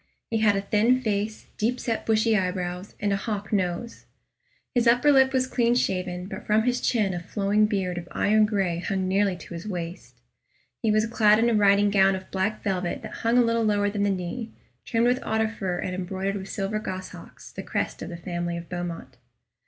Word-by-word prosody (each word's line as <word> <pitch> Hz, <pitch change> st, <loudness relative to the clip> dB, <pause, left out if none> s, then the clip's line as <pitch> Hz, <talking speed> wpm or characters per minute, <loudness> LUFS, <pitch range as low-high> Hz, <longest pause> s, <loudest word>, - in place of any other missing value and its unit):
He 225 Hz, -, +1 dB
had 210 Hz, -2 st, +4 dB
a 195 Hz, -, 0 dB
thin 220 Hz, +5 st, +3 dB
face, 215 Hz, -2 st, -2 dB
deep 240 Hz, +4 st, 0 dB
set 230 Hz, -2 st, -3 dB
bushy 220 Hz, 0 st, +3 dB
eyebrows, 180 Hz, -1 st, -2 dB
and 205 Hz, -1 st, 0 dB
a -, -, +1 dB
hawk 205 Hz, 0 st, -4 dB
nose. 190 Hz, +4 st, -2 dB, 0.7 s
His 240 Hz, -2 st, +2 dB
upper 245 Hz, +5 st, +5 dB
lip 265 Hz, -1 st, +5 dB
was 260 Hz, -1 st, +2 dB
clean 240 Hz, -2 st, +1 dB
shaven, 180 Hz, -5 st, -1 dB
but 195 Hz, -, -7 dB
from 215 Hz, +1 st, +3 dB
his 245 Hz, +1 st, 0 dB
chin 210 Hz, -6 st, +1 dB
a 175 Hz, -, -3 dB
flowing 205 Hz, +4 st, +1 dB
beard 185 Hz, -4 st, -1 dB
of 175 Hz, -, -10 dB
iron 215 Hz, +1 st, +3 dB
gray 190 Hz, -5 st, 0 dB
hung 190 Hz, +1 st, -2 dB
nearly 195 Hz, 0 st, +2 dB
to 175 Hz, -, -11 dB
his 170 Hz, +4 st, -7 dB
waist. 175 Hz, -2 st, -6 dB, 0.6 s
He 225 Hz, -, +1 dB
was 215 Hz, +1 st, +3 dB
clad 215 Hz, -2 st, +4 dB
in 235 Hz, +1 st, +3 dB
a -, -, +2 dB
riding 205 Hz, -1 st, +4 dB
gown 195 Hz, -1 st, +4 dB
of 190 Hz, 0 st, -9 dB
black 195 Hz, +3 st, -1 dB
velvet 185 Hz, -3 st, -2 dB
that -, -, -7 dB
hung 230 Hz, +2 st, +2 dB
a 245 Hz, -, +6 dB
little 230 Hz, 0 st, +1 dB
lower 205 Hz, -1 st, +2 dB
than 205 Hz, -1 st, -2 dB
the 205 Hz, -, +2 dB
knee, 195 Hz, +5 st, -3 dB, 0.4 s
trimmed 230 Hz, -1 st, +1 dB
with 250 Hz, +1 st, +3 dB
otter 220 Hz, 0 st, 0 dB
fur 190 Hz, -5 st, -3 dB
and 185 Hz, -, -3 dB
embroidered 190 Hz, +2 st, -3 dB
with 195 Hz, -1 st, -6 dB
silver 205 Hz, +2 st, -2 dB
goshawks 185 Hz, -3 st, -8 dB
the -, -, -6 dB
crest -, -, -3 dB
of -, -, -5 dB
the 170 Hz, -, -6 dB
family 175 Hz, 0 st, -3 dB
of 170 Hz, 0 st, -8 dB
Beaumont. 175 Hz, -2 st, -6 dB
205 Hz, 205 wpm, -25 LUFS, 185-225 Hz, 0.7 s, a